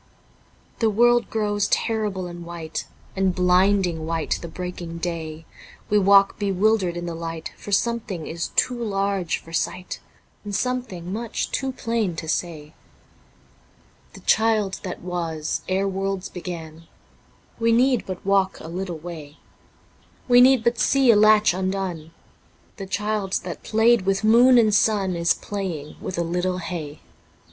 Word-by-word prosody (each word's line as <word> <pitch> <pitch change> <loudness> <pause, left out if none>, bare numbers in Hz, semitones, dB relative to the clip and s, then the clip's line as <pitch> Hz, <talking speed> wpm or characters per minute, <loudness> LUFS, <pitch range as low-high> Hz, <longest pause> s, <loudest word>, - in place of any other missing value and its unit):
The 225 - +3
world 240 +3 +3
grows 205 -2 0
terrible 210 -5 -1
and 175 -1 -8
white. 170 -2 -6 0.3
And 190 -2 +1
blinding 180 -2 +2
white 165 -1 -1
the 170 - -6
breaking 175 -1 -6
day, 165 -2 -5 0.5
We 210 - +5
walk 195 0 +5
bewildered 195 -2 +1
in 175 - -4
the 170 - -4
light, 165 -1 -6
For 205 - -9
something 200 -5 -1
is 170 +1 -4
too 245 -2 +1
large 195 -4 -1
for 165 - -14
sight. 180 +2 -3 0.4
And 205 -1 -4
something 200 -8 -3
much 230 +1 -3
too 270 0 -1
plain 230 -7 -2
to 160 - -6
say. 155 -2 -3 1.4
The - - -12
Child 215 -3 +2
that 180 - -6
was 165 -4 -3
ere 190 +1 +1
worlds 195 0 -3
begun 165 -3 -8 0.3
(... - - -33
We 230 0 +3
need 250 +2 +3
but 185 -1 -6
walk 195 -1 +2
a - - -9
little 175 0 -4
way... 155 -3 -9 0.9
We 245 -1 +7
need 255 -2 +6
but 235 -1 +1
see 265 +2 +4
a - - +4
latch 215 -1 +5
undone.. 185 -4 -3 0.3
.), - - -34
The 195 - -6
Child 210 -1 -2
that 175 -2 -6
played 225 -2 +3
with 195 +1 +1
moon 240 +4 +6
and 220 -3 +4
sun 200 -3 +2
Is 170 0 +2
playing 180 -8 -5
with 185 - -5
a 170 - +1
little 180 +2 -1
hay. 165 -4 -6
190 Hz, 150 wpm, -23 LUFS, 170-215 Hz, 1.4 s, We